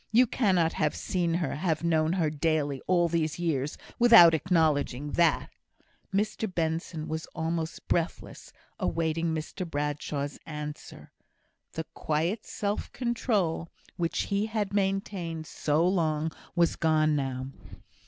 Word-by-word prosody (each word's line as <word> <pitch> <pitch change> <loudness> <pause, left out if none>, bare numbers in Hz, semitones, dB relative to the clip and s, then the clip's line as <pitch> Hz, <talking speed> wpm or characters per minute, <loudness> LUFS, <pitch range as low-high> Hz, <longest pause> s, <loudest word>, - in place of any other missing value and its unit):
You 240 +3 +6
cannot 185 -9 +2
have 150 -1 0
seen 170 -3 -1
her 170 -2 -1
have 160 -1 -1
known 160 -1 +2
her 165 -5 +1
daily, 150 -3 0
all 175 -2 +3
these 160 -2 -1
years, 150 -5 -1 0.2
without 230 -9 +9
acknowledging 150 -4 +1
that!" 170 -2 +2 0.6
Mr 210 +1 -1
Benson 160 -1 -2
was 160 0 -4
almost 165 0 -3
breathless, 170 0 -2 0.3
awaiting 165 0 0
Mr 160 +3 -3
Bradshaw's 145 -2 -3
answer. 150 -1 -8 0.6
The 160 - -3
quiet 165 +8 -1
self 205 0 -3
control 215 -9 0 0.3
which 170 -2 -1
he 200 +1 0
had 215 -3 -2
maintained 195 -5 -1
so 155 +2 +1
long, 160 -4 +1 0.2
was 170 -1 +3
gone 155 -2 +3
now. 130 -2 -2
165 Hz, 125 wpm, -28 LUFS, 155-185 Hz, 0.6 s, without